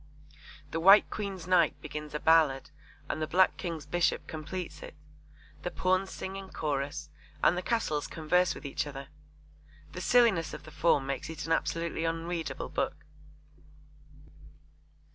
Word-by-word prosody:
The 165 - -1
White 195 +5 +7
Queen's 195 -5 -4
Knight 180 -3 +3
begins 150 0 -7
a - - -1
ballad 155 -4 +3 0.4
and - - -3
the 155 - -1
Black 185 +4 +4
King's 165 -4 -5
Bishop 175 +3 +1
completes 160 0 -6
it. - - -9 0.7
The - - -2
Pawns 185 +2 +1
sing 190 0 -6
in 195 -1 -8
chorus 150 -1 -3 0.3
and - - +5
the 180 - -2
Castles 185 -9 -1
converse 180 +3 +1
with 145 - -10
each 140 +1 -2
other. 140 -1 -8 0.8
The 180 - -6
silliness 220 -6 +3
of - - -10
the 155 - -12
form 145 -5 +2
makes 135 +1 -3
it 160 -2 -6
an 165 - -4
absolutely 165 0 0
unreadable 165 0 -3
book. - - -3
165 Hz, 145 wpm, -30 LUFS, 150-180 Hz, 0.8 s, White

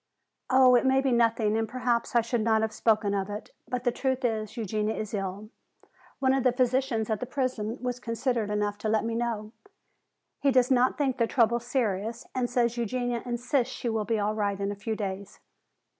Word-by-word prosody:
"Oh, 260 -1 +6
it 245 - +5
may 265 0 +4
be 270 -1 +1
nothing 230 -2 +2
and 225 -1 -1
perhaps 245 -1 -1
I 235 - +6
should 230 0 -1
not 220 0 +2
have 220 0 -1
spoken 215 -2 +2
of 195 0 -1
it. 205 +1 -7 0.2
But 250 0 -3
the 245 - +2
truth 260 +1 -1
is, 220 -1 -2
Eugenia 215 0 -1
is 215 0 -5
ill. 200 +2 -4 0.7
One 265 -1 +2
of 270 -1 +1
the 255 - +4
physicians 250 -3 0
at 215 - 0
the 250 - -4
prison 250 -4 -2
was 250 0 -2
considerate 230 -2 -1
enough 210 0 -1
to 215 - -2
let 220 +1 +1
me 230 - -2
know. 225 -2 -2 0.9
He 280 - +2
does 255 -1 +3
not 255 0 +3
think 270 -3 0
the 230 - +3
trouble 235 0 +3
serious 230 -2 -2
and 250 -2 -1
says 240 -1 +1
Eugenia 245 0 -1
insists 245 +2 -1
she 240 - -3
will 220 -2 -1
be 225 +1 0
all 210 +1 0
right 205 -2 -1
in 200 0 -1
a - - -4
few 220 +2 -3
days. 195 -2 -5
230 Hz, 205 wpm, -28 LUFS, 215-250 Hz, 0.9 s, Oh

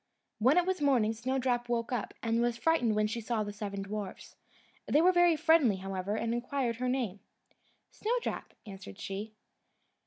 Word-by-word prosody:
When 260 +9 +4
it 355 - +4
was 375 -3 -1
morning, 245 -6 +3
Snowdrop 245 +1 -1
woke 235 0 -1
up, 240 -5 -3
and 230 0 +1
was 240 -1 +1
frightened 245 -6 +2
when 215 0 +2
she 230 +2 -3
saw 225 -1 -1
the 205 0 -6
seven 200 -2 -4
dwarfs. 200 -1 -6 0.5
They 295 - +4
were 355 +3 +6
very 350 -2 +5
friendly, 315 - +4
however, 190 +1 -3
and 230 +1 -1
inquired 240 0 -1
her 250 +1 -1
name. 240 -7 -1 0.7
"Snowdrop," 475 +3 -3
answered 195 - -10
she. 210 +3 -5
235 Hz, 165 wpm, -31 LUFS, 210-270 Hz, 0.7 s, were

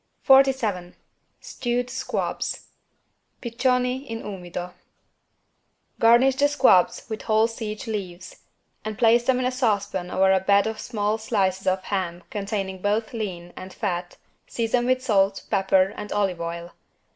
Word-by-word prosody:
47 260 -10 +3 0.5
STEWED 245 0 -2
SQUABS 260 - -3 0.7
(Piccioni 250 +2 0
in 225 0 -6
umido) 180 -2 -6 1.3
Garnish 240 +4 +5
the 285 +1 +4
squabs 260 -11 +3
with 220 -2 -5
whole 220 0 +3
sage 225 0 -5
leaves 190 -5 -6 0.5
and 215 -1 -5
place 235 0 +4
them 260 0 +3
in 255 - -1
a 255 - +1
saucepan 200 -7 -1
over 190 +1 +3
a 190 - +3
bed 200 +2 +3
of 220 0 -3
small 215 -2 -2
slices 195 -4 -1
of 185 0 +1
ham 180 -4 -3
containing 195 -2 -4
both 215 +3 -1
lean 180 -6 -5
and 185 0 -9
fat, 175 -4 -3 0.3
season 240 +1 0
with 255 0 +1
salt, 195 -5 +2
pepper 190 0 +2
and 210 - -7
olive 195 -4 0
oil. 170 +1 -5
210 Hz, 135 wpm, -24 LUFS, 190-240 Hz, 1.3 s, Garnish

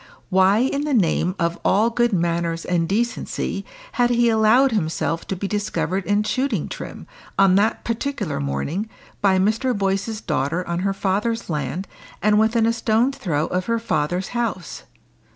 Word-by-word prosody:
Why 190 +2 +5
in 275 +2 0
the 295 -3 0
name 180 -2 +2
of 170 -1 -1
all 220 +4 +3
good 240 +1 +2
manners 170 -2 -1
and 170 -2 0
decency 235 +4 -2 0.3
had 245 -1 +2
he 240 -1 +3
allowed 225 +4 +4
himself 165 -4 -1
to 190 - -2
be 195 +2 -3
discovered 200 -2 -2
in 205 +1 +2
shooting 240 - -1
trim, - - -8 0.3
on 195 -1 +5
that 215 +3 +1
particular 230 - -2
morning, 70 - -2 0.3
by 195 -2 +4
Mr. 220 +5 +1
Boyce's 195 +2 -1
daughter 165 0 -1
on 170 0 -1
her 195 +1 0
father's 205 +2 -1
land, 150 +5 -3 0.3
and 210 0 +3
within 225 +1 +3
a 230 - +2
stone's 230 +4 +1
throw 160 - 0
of 180 0 -2
her 230 0 +1
father's 180 -4 -1
house? 225 -8 -3
200 Hz, 160 wpm, -22 LUFS, 175-230 Hz, 0.3 s, Why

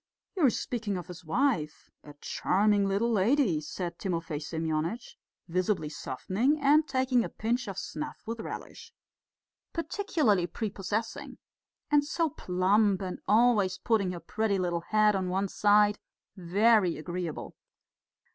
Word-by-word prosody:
"You 360 - 0
are - - +6
speaking 225 -4 -3
of 175 - -6
his 180 0 -10
wife? 165 - -1
A 145 - -12
charming 200 +1 +2
little 205 +5 +1
lady," 215 - +2
said 170 +2 -5
Timofey 165 -5 -3
Semyonitch, 160 +7 -3 0.3
visibly 180 -2 0
softening 205 - -1
and 295 +2 +4
taking 260 -2 +2
a - - -4
pinch 240 +2 -2
of 195 -2 -6
snuff 300 +7 -5
with 230 +1 -5
relish. 455 - -8 0.8
"Particularly 315 - 0
prepossessing. 210 +3 -4 0.5
And 295 -1 +5
so 320 +2 -1
plump, 195 +1 +1
and 185 -1 -5
always 215 -4 +3
putting 210 -6 +1
her 175 - -6
pretty 215 +2 -1
little 175 -2 -1
head 215 +3 +3
on 185 -1 -1
one 190 +2 0
side.... 205 +1 +3 0.4
Very 195 +1 +3
agreeable. 175 0 -5
205 Hz, 130 wpm, -29 LUFS, 180-235 Hz, 0.8 s, are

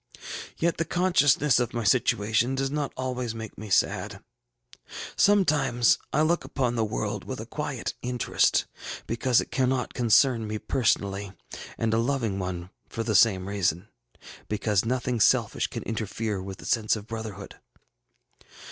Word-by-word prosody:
Yet 170 +1 0
the 165 - +1
consciousness 150 -6 +3
of 120 0 -2
my 120 - -1
situation 110 +2 +2
does 135 0 -1
not 145 -1 -2
always 125 -3 -3
make 110 -2 -7
me 110 +1 -8
sad. - - +1 1.0
Sometimes 150 -12 +3
I 150 - +2
look 170 +2 +1
upon 125 -4 -1
the 115 -2 0
world - - -3
with - - -6
a - - -6
quiet - - -4
interest, 125 -1 +1 0.4
because 120 +1 +2
it - - -9
cannot, 130 -1 0
concern 120 -1 +3
me 110 0 -3
personally, 100 -5 0 0.4
and 115 -1 0
a 115 - +3
loving 115 -5 0
one 90 -1 -5 0.2
for 115 - -3
the 110 - -1
same 95 -4 +4
reason, 100 -1 -1 0.6
because 105 -1 +1
nothing 125 0 -1
selfish - - +3
can - - -6
interfere 110 -2 -3
with 95 0 -7
the - - -12
sense 110 -1 +2
of 105 -2 -7
brotherhood. 110 -3 -7
115 Hz, 145 wpm, -26 LUFS, 105-130 Hz, 1.0 s, same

